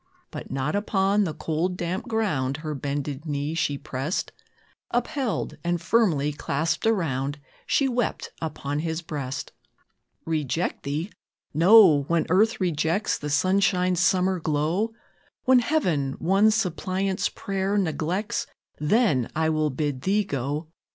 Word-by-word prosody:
But - - -7
not 135 +5 -1
upon 205 0 +2
the 160 - -3
cold, 170 +3 -1
damp 180 +6 -3
ground, 155 - 0
Her 155 - -2
bended 145 +1 -4
knee 145 +1 -2
she 145 -3 0
pressed; 140 +6 -3 0.6
Upheld, 245 0 -2
and 175 0 0
firmly 165 -7 +2
clasped 155 +7 -1
around, 145 - 0 0.3
She 275 - +3
wept 245 -3 -2
upon 145 -2 -3
his 160 +1 -3
breast. 140 -4 -5 0.7
"Reject 160 +1 -1
thee? 155 +8 -3 0.4
No! 170 -1 +7
When 170 -1 +1
earth 215 +6 +3
rejects 170 +2 0
The 150 - -4
sunshine's 185 +2 +2
summer 185 0 +2
glow, 160 +8 0 0.5
When 255 0 +6
Heaven 180 - 0
one 195 +8 +3
suppliant's 190 -2 0
prayer 195 +1 -2
neglects, 185 +5 -1 0.3
Then 150 - +2
will 155 -1 +1
I 140 - -5
bid 145 -3 -2
thee 200 +6 +2
go. 145 -1 -3
170 Hz, 125 wpm, -25 LUFS, 145-195 Hz, 0.7 s, No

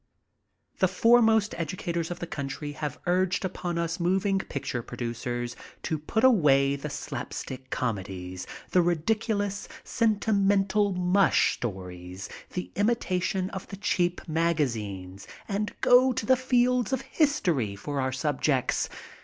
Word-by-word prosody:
The 185 - +5
foremost 220 +2 +4
educators 170 0 -2
of 175 - -4
the - - -4
country 145 -1 -5
have 145 -1 -4
urged 180 +1 +1
upon 175 -2 -3
us 170 0 -1
moving 190 +3 +2
picture 135 -8 -4
producers 120 +1 -4 0.3
to 160 - -1
put 220 - -1
away 140 - +5
the 140 +2 -5
slap - - -5
stick 130 0 -6
comedies, 95 -5 -3 0.2
the 180 - +5
ridiculous, 205 +4 0 0.2
sentimental 205 -2 +2
*'mush" 180 0 +3
stories, 90 -3 -6 0.2
the 180 - -4
imitation 190 -3 0
of 190 - -6
the 195 - -8
cheap 180 -3 0
magazines, 115 - -1 0.2
and 205 0 -3
go 255 +1 +6
to 225 - -3
the 260 - +5
fields 250 -1 +2
of 265 - 0
history 175 - +1
for 140 +7 -3
our 130 0 0
subjects. 135 0 0
175 Hz, 130 wpm, -27 LUFS, 130-205 Hz, 0.3 s, go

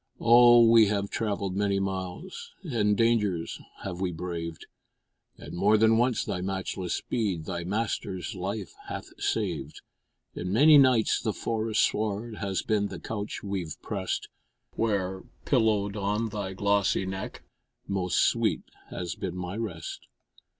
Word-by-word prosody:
Oh! 120 0 +7
we 115 -2 +7
have 100 -1 -1
travelled 100 -4 -2
many 100 -1 +1
miles, 95 - -5
And 105 - +1
dangers 105 -7 +1 0.2
have 90 -1 -5
we 95 -2 0
braved; 85 -1 -5 0.7
And - - -10
more 105 +5 +4
than 110 +1 +5
once 120 +1 +2
thy 90 - -3
matchless 95 -1 -3
speed 100 -9 -2
Thy 85 -1 -4
master's 100 0 -2
life 95 0 -4
hath - - -6
saved; - - -2 0.5
And 90 +1 -4
many 145 +7 +7
nights 130 -5 +4
the 110 -3 -1
forest 110 0 0
sward 110 +1 -1
Has 100 -2 -2
been 105 -2 +1
the - - -7
couch 105 -2 -5
we've 95 -6 -4
pressed, - - -3 0.5
Where, 95 -4 -1 0.2
pillowed 110 -5 +2
on 105 +2 -1
thy 100 -3 -4
glossy 100 0 +1
neck, 95 0 -6 0.4
Most 90 -3 +1
sweet - - +2 0.3
has 85 -3 -4
been - - -5
my 90 +1 -4
rest. 95 -8 -5
100 Hz, 135 wpm, -28 LUFS, 95-110 Hz, 0.7 s, Oh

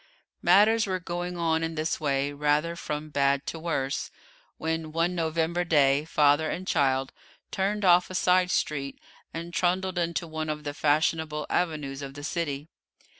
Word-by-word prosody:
Matters 210 +5 +5
were 185 -1 -1
going 175 0 -4
on 165 -1 +1
in 165 0 -3
this 155 +1 -1
way, 140 -1 0
rather 150 +3 +1
from 150 -2 -5
bad 140 0 +1
to 165 - -5
worse, 140 -5 -2 0.5
when 160 0 -3
one 165 +3 0
November 165 +1 0
day 145 -3 +3
father 150 0 +3
and 185 +2 -4
child 135 -3 +1 0.4
turned 200 +1 -1
off 180 0 +5
a 185 - -6
side 180 0 +3
street, 140 -6 -1 0.3
and 170 +1 -6
trundled 185 +1 0
into 170 0 -1
one 155 -1 -4
of 150 0 -3
the 145 -1 -4
fashionable 155 +1 +1
avenues 150 -5 -1
of 135 -1 -7
the 145 - -8
city. 150 -3 -3
160 Hz, 160 wpm, -27 LUFS, 145-175 Hz, 0.5 s, Matters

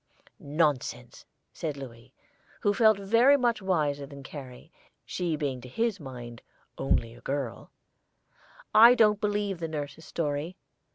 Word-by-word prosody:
"Nonsense!" 150 -4 -1 0.3
said 150 -3 -4
Louis, 125 -2 -10 0.5
who 205 - +2
felt 220 -1 +5
very 230 +8 +4
much 240 -4 +1
wiser 150 -7 0
than 140 0 -11
Carrie, 135 -3 -10 0.3
she 175 -3 -2
being 140 -4 -3
to 125 - -11
his 225 - -1
mind 120 -5 -9 0.3
"only 115 -3 0
a 120 - -16
girl;" 135 -3 -4 1.0
"I 235 +3 +9
don't 210 -3 +4
believe 205 -3 -1
nurse's 155 -1 -5
story. 155 +3 -3
155 Hz, 125 wpm, -28 LUFS, 135-205 Hz, 1.0 s, I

